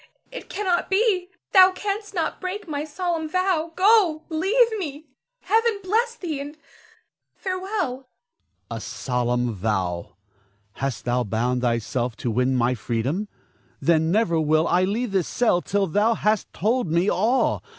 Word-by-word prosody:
It -, -, -9 dB
cannot 370 Hz, -4 st, -1 dB
be! 385 Hz, -3 st, +2 dB, 0.2 s
Thou 375 Hz, -1 st, +8 dB
canst 410 Hz, +2 st, -4 dB
not 330 Hz, -3 st, -2 dB
break 375 Hz, +1 st, -4 dB
my 295 Hz, -2 st, -3 dB
solemn 320 Hz, 0 st, -3 dB
vow. 360 Hz, -2 st, 0 dB
Go! 370 Hz, -6 st, +4 dB
leave 435 Hz, +9 st, +2 dB
me! 300 Hz, -3 st, -6 dB, 0.4 s
Heaven 445 Hz, +2 st, +2 dB
bless 460 Hz, +5 st, +1 dB
thee, 330 Hz, -10 st, -4 dB
and 290 Hz, +2 st, -8 dB, 0.8 s
farewell! 375 Hz, -4 st, -2 dB
Ernest. 260 Hz, +1 st, -10 dB, 0.6 s
A -, -, -3 dB
solemn 125 Hz, -1 st, -1 dB
vow! 95 Hz, -4 st, -2 dB, 0.6 s
Hast 135 Hz, +3 st, -4 dB
thou 125 Hz, 0 st, +1 dB
bound 120 Hz, +4 st, -1 dB
thyself 120 Hz, 0 st, -1 dB
to 120 Hz, -, -3 dB
win 125 Hz, +3 st, +1 dB
my 125 Hz, 0 st, +2 dB
freedom? 125 Hz, -, -2 dB, 0.5 s
Then 160 Hz, -1 st, +2 dB
never 175 Hz, -4 st, +2 dB
will 155 Hz, +2 st, +2 dB
I 180 Hz, +1 st, +3 dB
leave 220 Hz, +4 st, -2 dB
this 190 Hz, -4 st, +1 dB
cell 220 Hz, -7 st, +2 dB
till 200 Hz, +2 st, 0 dB
thou 205 Hz, +6 st, +2 dB
hast 215 Hz, -1 st, 0 dB
told 230 Hz, +4 st, 0 dB
me 170 Hz, +4 st, +2 dB
all. 225 Hz, +7 st, +2 dB
245 Hz, 145 wpm, -24 LUFS, -, 0.8 s, Thou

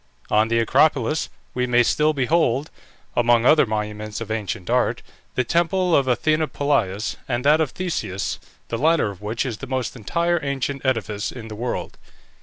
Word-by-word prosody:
On 110 Hz, +1 st, +4 dB
the 115 Hz, 0 st, +1 dB
Acropolis 140 Hz, +4 st, +2 dB, 0.2 s
we 125 Hz, 0 st, 0 dB
may 120 Hz, 0 st, +4 dB
still 150 Hz, +5 st, +2 dB
behold, 145 Hz, -1 st, +1 dB, 0.4 s
among 120 Hz, -1 st, +3 dB
other 150 Hz, -1 st, +6 dB
monuments 105 Hz, 0 st, -3 dB
of 115 Hz, -2 st, -6 dB
ancient 100 Hz, -5 st, -3 dB
art, -, -, +1 dB, 0.3 s
the 130 Hz, -, +2 dB
temple 170 Hz, +5 st, +2 dB
of 135 Hz, -2 st, +3 dB
Athene 140 Hz, +6 st, +2 dB
Polias, 115 Hz, -10 st, -1 dB
and 125 Hz, 0 st, -2 dB
that 150 Hz, +2 st, +5 dB
of 155 Hz, -, +1 dB
Theseus, 160 Hz, -, -3 dB, 0.3 s
the 115 Hz, -, -2 dB
latter 155 Hz, -7 st, +3 dB
of 100 Hz, -1 st, -13 dB
which 110 Hz, +5 st, -2 dB
is 120 Hz, -5 st, -3 dB
the 135 Hz, -, -8 dB
most 130 Hz, -2 st, -2 dB
entire 170 Hz, -, 0 dB
ancient 140 Hz, 0 st, -2 dB
edifice 105 Hz, -6 st, -1 dB
in 115 Hz, -3 st, -9 dB
the 110 Hz, -, -7 dB
world. 120 Hz, +3 st, -4 dB
125 Hz, 170 wpm, -22 LUFS, 110-150 Hz, 0.4 s, other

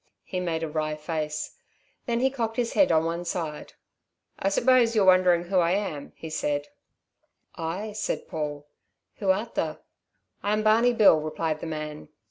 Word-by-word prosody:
He 185 Hz, -, -4 dB
made 165 Hz, -2 st, -2 dB
a -, -, -1 dB
wry 155 Hz, 0 st, -2 dB
face. 150 Hz, 0 st, -4 dB, 0.5 s
Then 235 Hz, 0 st, 0 dB
he 265 Hz, +1 st, +3 dB
cocked 230 Hz, -4 st, -3 dB
his 240 Hz, -2 st, 0 dB
head 290 Hz, -2 st, +4 dB
on 160 Hz, 0 st, +3 dB
one 170 Hz, +1 st, -2 dB
side. 165 Hz, -4 st, -4 dB, 0.7 s
"I 195 Hz, -, +1 dB
suppose 235 Hz, +2 st, +4 dB
you're 205 Hz, -3 st, +4 dB
wondering 185 Hz, -2 st, +5 dB
who 185 Hz, +1 st, +1 dB
I 170 Hz, 0 st, +3 dB
am?" 190 Hz, -8 st, -3 dB, 0.2 s
said 145 Hz, -2 st, -1 dB
he. -, -, -26 dB, 0.9 s
"Ay," 185 Hz, +7 st, -3 dB
said 210 Hz, 0 st, -3 dB
Paul. 145 Hz, -2 st, -4 dB, 0.5 s
"Who 200 Hz, -, -2 dB
art 205 Hz, +5 st, +1 dB
tha?" -, -, -2 dB, 0.6 s
"I'm 210 Hz, +1 st, 0 dB
Barney 230 Hz, +3 st, +4 dB
Bill," 210 Hz, -8 st, +6 dB
replied 155 Hz, 0 st, -2 dB
the 165 Hz, -, -6 dB
man. 155 Hz, -1 st, -5 dB
175 Hz, 165 wpm, -26 LUFS, 155-215 Hz, 0.9 s, Bill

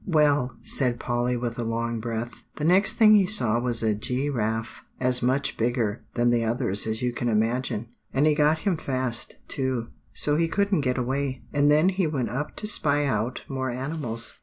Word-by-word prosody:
"Well," 145 Hz, -7 st, +2 dB
said 125 Hz, -3 st, +1 dB
Polly 120 Hz, 0 st, -1 dB
with 120 Hz, -1 st, -4 dB
a -, -, -1 dB
long 115 Hz, 0 st, -2 dB
breath, 115 Hz, +1 st, -5 dB
"the 150 Hz, -, -5 dB
next 185 Hz, +5 st, +4 dB
thing 215 Hz, -2 st, +6 dB
he 200 Hz, -3 st, +5 dB
saw 120 Hz, -, +4 dB
was 120 Hz, -2 st, +1 dB
a 110 Hz, -1 st, +2 dB
gi 125 Hz, +6 st, -2 dB
raffe, 110 Hz, -2 st, -3 dB, 0.2 s
as 125 Hz, -1 st, +2 dB
much 130 Hz, +3 st, 0 dB
bigger 115 Hz, -2 st, -1 dB
than 120 Hz, 0 st, +2 dB
the 120 Hz, -1 st, +2 dB
others 115 Hz, -3 st, 0 dB
as 110 Hz, +2 st, -2 dB
you 125 Hz, -1 st, 0 dB
can 120 Hz, 0 st, -2 dB
imagine. 115 Hz, +1 st, -1 dB, 0.2 s
And 140 Hz, +3 st, +2 dB
he 155 Hz, -, +4 dB
got 150 Hz, +1 st, +3 dB
him 190 Hz, -5 st, +1 dB
fast, 130 Hz, -4 st, -2 dB
too, 130 Hz, -4 st, -2 dB, 0.2 s
so 150 Hz, 0 st, 0 dB
he 165 Hz, 0 st, +2 dB
couldn't 200 Hz, 0 st, +1 dB
get 125 Hz, -2 st, -1 dB
away; 130 Hz, +1 st, -2 dB
and 145 Hz, 0 st, +3 dB
then 155 Hz, +5 st, +4 dB
he 190 Hz, -2 st, 0 dB
went 130 Hz, -7 st, -2 dB
up 145 Hz, +5 st, -4 dB
to -, -, -5 dB
spy 145 Hz, -8 st, +1 dB
out 120 Hz, -2 st, -2 dB
more 130 Hz, -1 st, -3 dB
animals. 125 Hz, -2 st, -4 dB
125 Hz, 195 wpm, -25 LUFS, 115-145 Hz, 0.2 s, thing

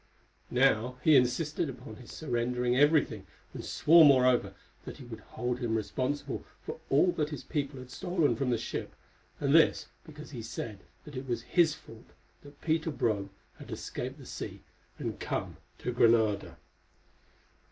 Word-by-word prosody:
Now 125 Hz, -1 st, +2 dB
he 155 Hz, -, +6 dB
insisted 145 Hz, +5 st, +2 dB
upon 125 Hz, -4 st, -9 dB
his 125 Hz, -, -12 dB
surrendering 125 Hz, -3 st, -1 dB
everything, 140 Hz, -8 st, +3 dB, 0.3 s
and -, -, -6 dB
swore, 165 Hz, +1 st, +6 dB
moreover, 130 Hz, -4 st, +5 dB, 0.3 s
that -, -, -8 dB
he -, -, -10 dB
would 115 Hz, -2 st, -8 dB
hold 125 Hz, +2 st, -4 dB
him 120 Hz, -3 st, -1 dB
responsible 130 Hz, +6 st, -2 dB, 0.2 s
for -, -, -6 dB
all 150 Hz, +6 st, +4 dB
that 150 Hz, -3 st, -1 dB
his 150 Hz, -, -6 dB
people 145 Hz, -3 st, -3 dB
had 125 Hz, 0 st, -10 dB
stolen 175 Hz, -1 st, +1 dB
from 135 Hz, -2 st, -1 dB
the 120 Hz, -, +2 dB
ship, -, -, -5 dB, 0.4 s
and 140 Hz, -1 st, +1 dB
this 165 Hz, 0 st, +4 dB
because 155 Hz, -2 st, -11 dB
he 125 Hz, -5 st, -6 dB
said 110 Hz, -2 st, -6 dB, 0.3 s
that 150 Hz, -, -10 dB
it 130 Hz, +1 st, -5 dB
was 120 Hz, -, -2 dB
his 165 Hz, -4 st, +3 dB
fault 115 Hz, -5 st, -15 dB, 0.3 s
that 145 Hz, 0 st, -16 dB
Peter 160 Hz, 0 st, 0 dB
Brome 110 Hz, -8 st, -1 dB, 0.3 s
had -, -, -11 dB
escaped -, -, -5 dB
the -, -, -12 dB
sea -, -, -7 dB, 0.3 s
and -, -, -4 dB
come -, -, -1 dB
on -, -, -13 dB, 0.2 s
to 125 Hz, -, -3 dB
Granada. 115 Hz, -4 st, +3 dB
130 Hz, 165 wpm, -30 LUFS, 120-150 Hz, 0.4 s, he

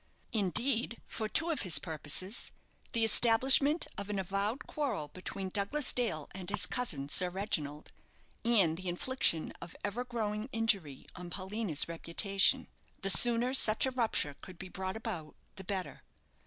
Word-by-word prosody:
Indeed, 230 Hz, -, +1 dB
for 215 Hz, -1 st, -5 dB
two 330 Hz, +7 st, 0 dB
of 315 Hz, -, -3 dB
his 170 Hz, -6 st, +5 dB
purposes 160 Hz, +7 st, +1 dB, 0.4 s
the 230 Hz, -1 st, +2 dB
establishment 265 Hz, +8 st, +4 dB
of 200 Hz, 0 st, -7 dB
an 205 Hz, -, -3 dB
avowed 200 Hz, +6 st, -3 dB
quarrel 230 Hz, -, -4 dB
between 190 Hz, +2 st, -7 dB
Douglas 205 Hz, +10 st, -1 dB
Dale 215 Hz, -, -3 dB
and 185 Hz, -1 st, -8 dB
his 205 Hz, -, +2 dB
cousin, 160 Hz, -, -3 dB
Sir 180 Hz, +5 st, +7 dB
Reginald, 155 Hz, -6 st, -4 dB, 0.5 s
and 200 Hz, -9 st, +2 dB
the 185 Hz, 0 st, -5 dB
infliction 175 Hz, -3 st, 0 dB
of 170 Hz, -, -10 dB
ever 205 Hz, +4 st, -3 dB
growing 220 Hz, -2 st, -4 dB
injury 200 Hz, -, -1 dB
on 180 Hz, -1 st, -9 dB
Paulina's 190 Hz, -3 st, -1 dB
reputation, 175 Hz, +4 st, +1 dB, 0.4 s
the 195 Hz, -, +5 dB
sooner 240 Hz, +4 st, +5 dB
such 220 Hz, -4 st, +5 dB
a 265 Hz, -, -2 dB
rupture 225 Hz, -, -1 dB
could 185 Hz, -2 st, -12 dB
be 185 Hz, 0 st, -9 dB
brought 190 Hz, +1 st, -5 dB
about 205 Hz, -9 st, -7 dB, 0.2 s
the 190 Hz, -, -9 dB
better. 190 Hz, -1 st, -5 dB
200 Hz, 150 wpm, -31 LUFS, 180-230 Hz, 0.5 s, Sir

